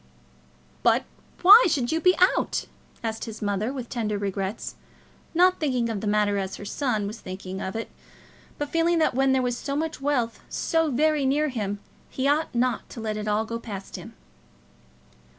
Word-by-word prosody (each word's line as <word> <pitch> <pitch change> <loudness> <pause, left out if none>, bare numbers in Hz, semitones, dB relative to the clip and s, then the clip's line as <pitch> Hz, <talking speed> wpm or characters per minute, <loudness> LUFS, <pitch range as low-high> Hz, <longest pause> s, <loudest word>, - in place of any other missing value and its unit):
"But - - +4 0.4
why 415 +7 +10
should 255 -6 0
you 325 +1 0
be 365 +1 +5 0.2
out?" - - -1 0.4
asked 225 -1 -3
his 225 -1 -8
mother 205 +3 -1
with 260 -3 -5
tender 215 -4 -2
regrets, 195 +1 -3 0.6
not 365 +2 +4
thinking 255 -6 0
of 215 -3 -3
the 215 - -3
matter 205 -1 +2
as 190 0 -3
her 205 - -9
son 220 -2 -1
was 215 +3 -6
thinking 185 0 -7
of 190 - -4
it, 225 - -4 0.7
but 290 -1 -3
feeling 335 +1 +2
that 320 - +2
when 270 +1 +3
there 265 -1 +2
was 245 -1 0
so 280 +3 -4
much 315 -1 -3
wealth 255 -5 0
so 325 -1 +1
very 300 +2 +2
near 295 +3 +2
him, 205 -5 -3 0.3
he 265 +1 -1
ought 295 -1 +1
not 245 -1 0
to - - -9
let 220 -1 -2
it 215 0 -4
all 210 +1 +1
go 230 +1 -4
past 200 -4 -7
him. - - -9
240 Hz, 185 wpm, -25 LUFS, 210-290 Hz, 0.7 s, why